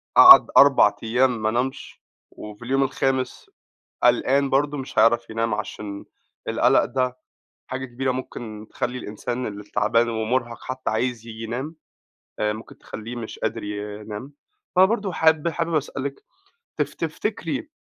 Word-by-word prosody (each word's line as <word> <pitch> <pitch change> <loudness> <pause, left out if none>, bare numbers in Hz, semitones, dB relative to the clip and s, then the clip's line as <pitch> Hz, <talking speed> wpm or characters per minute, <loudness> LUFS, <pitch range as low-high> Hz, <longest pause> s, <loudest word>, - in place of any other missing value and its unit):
قعَد 370 0 +10
4 135 -7 +6
أيام 125 +1 +1
ما 110 - +2
نامش 125 +3 -3 0.3
وفي 105 +3 -10
اليوم 135 +2 +2
الخامس 130 -1 -2 0.5
قلقان 135 +3 +3
برضه، 145 +1 +1
مش 130 - -6
هيعرف 120 0 +4
ينام 115 -1 -1
عشان 105 -1 -6 0.4
القَلَق - - +3
ده 130 -1 -1 0.5
حاجة 130 0 -4
كبيرة، 130 +1 -2
ممكن 110 -4 -7
تخلّي 125 +1 -3
الإنسان 120 +2 -4
اللي 105 0 -7
تعبان 110 +3 +1
ومُرهق 115 +1 -1
حتى 130 0 -4
عايز 115 0 -2
ييجي 115 0 -8
ينام 130 +8 -5 0.6
آآ، 105 0 +1
ممكن 110 +1 -11
تخلّيه 115 +3 -8
مش 115 -2 -7
قادر - - -3
ينام، 105 +4 -6 0.4
فبرضه 195 +1 +3
حاب 160 0 +3
حابب 165 +1 -2
أسألِك 140 -2 -3 0.6
تف - - -1
تفتكري 315 -3 -3
125 Hz, 135 wpm, -23 LUFS, 110-135 Hz, 0.6 s, قعَد